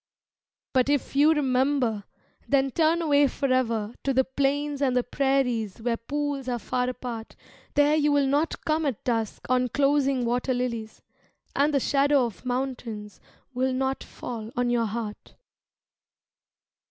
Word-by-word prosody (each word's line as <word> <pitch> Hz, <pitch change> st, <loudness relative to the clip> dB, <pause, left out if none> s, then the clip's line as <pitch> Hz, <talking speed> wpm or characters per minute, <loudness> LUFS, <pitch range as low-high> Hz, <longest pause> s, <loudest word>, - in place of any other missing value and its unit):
But 260 Hz, 0 st, +3 dB
if 285 Hz, -1 st, 0 dB
you 295 Hz, +3 st, +6 dB
remember, 260 Hz, -6 st, +1 dB, 0.4 s
then 270 Hz, -1 st, +2 dB
turn 330 Hz, +3 st, +2 dB
away 290 Hz, -2 st, +4 dB
forever 240 Hz, -5 st, 0 dB
To 270 Hz, -2 st, 0 dB
the 265 Hz, -, +5 dB
plains 280 Hz, +2 st, -1 dB
and 260 Hz, -3 st, +2 dB
the 250 Hz, -, +2 dB
prairies 250 Hz, -6 st, 0 dB
where 230 Hz, +1 st, 0 dB
pools 285 Hz, +2 st, -3 dB
are 245 Hz, -, 0 dB
far 250 Hz, +3 st, -1 dB
apart, 245 Hz, -3 st, -6 dB, 0.4 s
There 290 Hz, +1 st, +4 dB
you 300 Hz, -1 st, +2 dB
will 285 Hz, -1 st, +3 dB
not 290 Hz, +4 st, 0 dB
come 310 Hz, 0 st, +1 dB
at 260 Hz, -7 st, -3 dB
dusk 225 Hz, -3 st, -2 dB
on 255 Hz, 0 st, +2 dB
closing 275 Hz, -1 st, +2 dB
water 245 Hz, +2 st, 0 dB
lilies, 235 Hz, -3 st, -4 dB, 0.5 s
And 285 Hz, +2 st, +3 dB
the 280 Hz, -, +2 dB
shadow 280 Hz, 0 st, +3 dB
of 225 Hz, -1 st, -8 dB
mountains 245 Hz, -5 st, -4 dB, 0.3 s
will 260 Hz, +1 st, 0 dB
not 265 Hz, +1 st, -1 dB
fall 225 Hz, -3 st, -7 dB
on 245 Hz, 0 st, +1 dB
your 235 Hz, -2 st, +1 dB
heart. 215 Hz, -1 st, -6 dB
260 Hz, 145 wpm, -26 LUFS, 240-285 Hz, 0.5 s, you